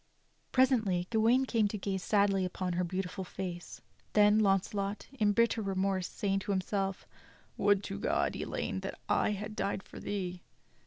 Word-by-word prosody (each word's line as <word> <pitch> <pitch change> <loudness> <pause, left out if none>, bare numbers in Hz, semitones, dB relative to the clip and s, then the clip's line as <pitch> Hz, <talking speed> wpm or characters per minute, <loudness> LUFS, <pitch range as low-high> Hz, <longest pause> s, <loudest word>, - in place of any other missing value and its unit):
Presently 220 -9 +3
Gawain 235 +4 +4
came 225 -5 +2
to 210 - -4
gaze 190 -1 -2
sadly 200 -1 +2
upon 180 0 -2
her 180 +1 0
beautiful 185 +2 -3
face; 180 -1 -6 0.3
then 210 0 +6
Launcelot, 200 0 +1
in 215 -6 +2
bitter 230 +1 +2
remorse 195 -2 0
saying 195 -1 -1
to 200 +1 -4
himself: 195 0 -1 0.5
"Would 205 -1 +3
to 200 0 -5
God, - - 0
Elaine, - - -3
that - - -6
I 210 - +2
had 210 +1 -5
died 195 0 -2
for - - -11
thee." 185 -3 -4
200 Hz, 155 wpm, -32 LUFS, 190-210 Hz, 0.5 s, then